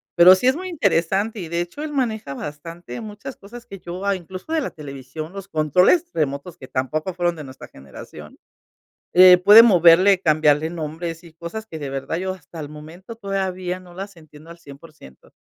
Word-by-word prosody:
Pero 180 Hz, +2 st, +8 dB
sí 220 Hz, -, -4 dB
es 260 Hz, -, +4 dB
muy 370 Hz, -, -6 dB
interesante 205 Hz, -, 0 dB
y 175 Hz, -, -6 dB
de 170 Hz, +1 st, -2 dB
hecho, 175 Hz, +12 st, -7 dB
él 305 Hz, -1 st, -5 dB
maneja 220 Hz, -, -2 dB
bastante 165 Hz, -, -8 dB
muchas 220 Hz, +5 st, -9 dB
cosas 235 Hz, +4 st, -12 dB
que 195 Hz, -, -11 dB
yo, 180 Hz, +3 st, -7 dB
ah, 200 Hz, -, +1 dB
incluso 185 Hz, -, -10 dB
de 325 Hz, -, +1 dB
la 270 Hz, -, -3 dB
televisión, 145 Hz, +2 st, -9 dB
los 195 Hz, -1 st, -9 dB
controles 180 Hz, -, +3 dB
remotos 150 Hz, +3 st, -3 dB
que 130 Hz, -, -12 dB
tampoco 155 Hz, +9 st, -3 dB
fueron 175 Hz, -1 st, -1 dB
de 150 Hz, -, -8 dB
nuestra 130 Hz, 0 st, -12 dB
generación. 65 Hz, 0 st, -13 dB, 0.8 s
Eh, 180 Hz, 0 st, +8 dB
puede 210 Hz, +5 st, +9 dB
moverle, 185 Hz, -2 st, +5 dB
cambiarle 155 Hz, -1 st, +2 dB
nombres 165 Hz, +1 st, -6 dB
y 165 Hz, -2 st, -16 dB
cosas 170 Hz, +7 st, -7 dB
que 160 Hz, -7 st, -8 dB
de 145 Hz, -3 st, -6 dB
verdad 135 Hz, +4 st, -4 dB
yo 185 Hz, +2 st, -3 dB
hasta 165 Hz, -2 st, -11 dB
el 145 Hz, -, -7 dB
momento 160 Hz, +8 st, -11 dB
todavía 190 Hz, -3 st, -3 dB
no 175 Hz, -1 st, -16 dB
las 195 Hz, 0 st, -8 dB
entiendo 155 Hz, 0 st, -16 dB
al 170 Hz, -, -12 dB
100%. 140 Hz, -, -16 dB
175 Hz, 190 wpm, -21 LUFS, 155-195 Hz, 0.8 s, puede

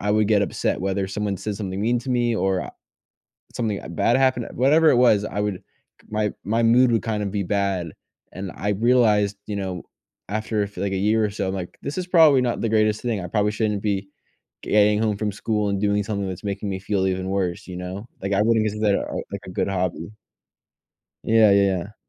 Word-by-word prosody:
I 105 Hz, -, -1 dB
would 105 Hz, 0 st, +2 dB
get 105 Hz, -2 st, +4 dB
upset 100 Hz, -, -1 dB
whether 95 Hz, 0 st, -1 dB
someone 100 Hz, 0 st, -2 dB
said 105 Hz, +2 st, -4 dB
something 95 Hz, -2 st, -4 dB
mean 120 Hz, +3 st, +1 dB
to 130 Hz, +2 st, -6 dB
me, 120 Hz, -1 st, +1 dB
or, 95 Hz, -2 st, +1 dB
uh, -, -, -8 dB, 0.8 s
something, 110 Hz, -4 st, -2 dB
uh, -, -, -9 dB
bad 115 Hz, +9 st, +2 dB
happened. 130 Hz, -3 st, +1 dB
Whatever 155 Hz, +5 st, +4 dB
it -, -, +4 dB
was, 110 Hz, -4 st, +4 dB
I 105 Hz, -, -4 dB
would 105 Hz, -3 st, -3 dB, 0.5 s
my 105 Hz, -1 st, -1 dB
my 115 Hz, +4 st, 0 dB
mood 120 Hz, +2 st, +5 dB
would 115 Hz, -4 st, +1 dB
kind 105 Hz, -2 st, -2 dB
of 100 Hz, -, -3 dB
be 100 Hz, -1 st, -1 dB
bad, 95 Hz, -3 st, -1 dB, 0.4 s
and 95 Hz, -1 st, -6 dB
I 105 Hz, -, -3 dB
realized, 105 Hz, -2 st, +3 dB
you 105 Hz, -, -3 dB
know, 95 Hz, -3 st, -4 dB, 0.5 s
after 110 Hz, +1 st, -1 dB
a 100 Hz, -, +1 dB
f 100 Hz, -, -13 dB
like, 100 Hz, +2 st, -2 dB
a -, -, 0 dB
year 110 Hz, +3 st, +2 dB
or -, -, -1 dB
so, 100 Hz, -2 st, -3 dB
I'm 95 Hz, -, -2 dB
like, 90 Hz, -2 st, -6 dB
"This 140 Hz, -, -5 dB
is 180 Hz, -1 st, -3 dB
probably 160 Hz, -7 st, +6 dB
not 120 Hz, -1 st, -1 dB
the 115 Hz, -, 0 dB
greatest 110 Hz, -1 st, +2 dB
thing. 115 Hz, -5 st, -2 dB
I 90 Hz, -, -5 dB
probably 105 Hz, +2 st, +1 dB
shouldn't 105 Hz, -2 st, -1 dB
be 100 Hz, -2 st, -1 dB, 0.5 s
getting 105 Hz, 0 st, +3 dB
home 105 Hz, -2 st, 0 dB
from 105 Hz, 0 st, -1 dB
school 105 Hz, +1 st, -1 dB
and 100 Hz, 0 st, -1 dB
doing 105 Hz, 0 st, +1 dB
something 100 Hz, -2 st, -2 dB
that's 95 Hz, -1 st, -6 dB
making 100 Hz, 0 st, -3 dB
me 95 Hz, -1 st, -3 dB
feel 95 Hz, 0 st, -1 dB
even 95 Hz, 0 st, -2 dB
worse," 95 Hz, -3 st, -2 dB
you 90 Hz, -, -7 dB
know? 95 Hz, +5 st, -6 dB
Like, 100 Hz, +1 st, -2 dB
I 100 Hz, -, +3 dB
wouldn't 110 Hz, 0 st, +3 dB
consider 105 Hz, -1 st, +1 dB
that, -, -, -1 dB
uh, -, -, -5 dB, 0.2 s
like, -, -, -5 dB
a -, -, -8 dB
good -, -, -1 dB
hobby. 90 Hz, -2 st, -2 dB, 1.2 s
Yeah, 110 Hz, -1 st, +5 dB
yeah. 100 Hz, 0 st, +1 dB
105 Hz, 225 wpm, -23 LUFS, 95-110 Hz, 1.2 s, probably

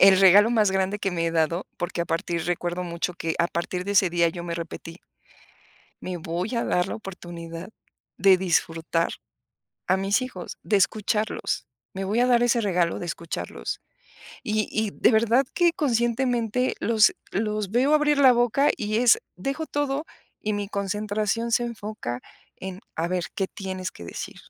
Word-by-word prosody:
el 190 Hz, 0 st, +8 dB
regalo 200 Hz, +4 st, +7 dB
más 215 Hz, -4 st, +3 dB
grande 190 Hz, +2 st, 0 dB
que 195 Hz, -, -1 dB
me 170 Hz, -1 st, -1 dB
he -, -, +1 dB
dado, 165 Hz, +2 st, 0 dB
porque, 175 Hz, -1 st, -3 dB
a -, -, +1 dB
partir 165 Hz, +1 st, -2 dB
recuerdo 175 Hz, 0 st, -2 dB
mucho 170 Hz, +1 st, -3 dB
que 165 Hz, -1 st, -2 dB
a 170 Hz, -, +3 dB
partir 180 Hz, +1 st, -3 dB
de 200 Hz, -, -2 dB
ese 190 Hz, -3 st, +4 dB
día 170 Hz, -1 st, +3 dB
yo 170 Hz, +1 st, -6 dB
me 170 Hz, -1 st, -3 dB
repetí 165 Hz, 0 st, -7 dB, 1.0 s
me 185 Hz, -1 st, -4 dB
voy 175 Hz, +7 st, -3 dB
a 235 Hz, -, +1 dB
dar 180 Hz, -, +1 dB
la -, -, -4 dB
oportunidad, 175 Hz, -3 st, -8 dB, 0.5 s
de 195 Hz, -1 st, +6 dB
disfrutar 165 Hz, -2 st, 0 dB, 0.8 s
a 190 Hz, -, +4 dB
mis 195 Hz, +5 st, +1 dB
hijos, 195 Hz, -9 st, -7 dB
de 210 Hz, -, +2 dB
escucharlos. 210 Hz, +3 st, 0 dB, 0.3 s
Me 195 Hz, 0 st, -3 dB
voy 210 Hz, +5 st, +1 dB
a 250 Hz, -, +4 dB
dar 240 Hz, -1 st, +4 dB
ese 240 Hz, 0 st, +3 dB
regalo 180 Hz, -5 st, +1 dB
de 175 Hz, -, -4 dB
escucharlos 90 Hz, -, -5 dB, 0.6 s
y 215 Hz, 0 st, 0 dB
y 220 Hz, -2 st, 0 dB
de -, -, +3 dB
verdad 235 Hz, +4 st, +4 dB
que 345 Hz, -2 st, +4 dB
conscientemente 245 Hz, -, +1 dB
los 220 Hz, -3 st, +4 dB, 0.2 s
los 210 Hz, -1 st, -1 dB
veo 260 Hz, +6 st, +3 dB
abrir 295 Hz, -1 st, +3 dB
la 260 Hz, -2 st, +8 dB
boca, 245 Hz, +4 st, +3 dB
y 215 Hz, 0 st, -1 dB
es 240 Hz, -1 st, +6 dB, 0.2 s
dejo 275 Hz, -, -3 dB
todo 290 Hz, +1 st, -1 dB, 0.3 s
y 215 Hz, -, -2 dB
mi 205 Hz, -1 st, -2 dB
concentración 210 Hz, +3 st, -1 dB
se 240 Hz, -, +3 dB
enfoca 215 Hz, -, -5 dB, 0.3 s
en, 190 Hz, 0 st, -7 dB
a 165 Hz, +1 st, -1 dB
ver 180 Hz, -1 st, -1 dB
qué 195 Hz, -1 st, 0 dB
tienes 185 Hz, -1 st, -5 dB
que 85 Hz, -, -11 dB
decir. -, -, -6 dB
195 Hz, 175 wpm, -25 LUFS, 175-230 Hz, 1.0 s, el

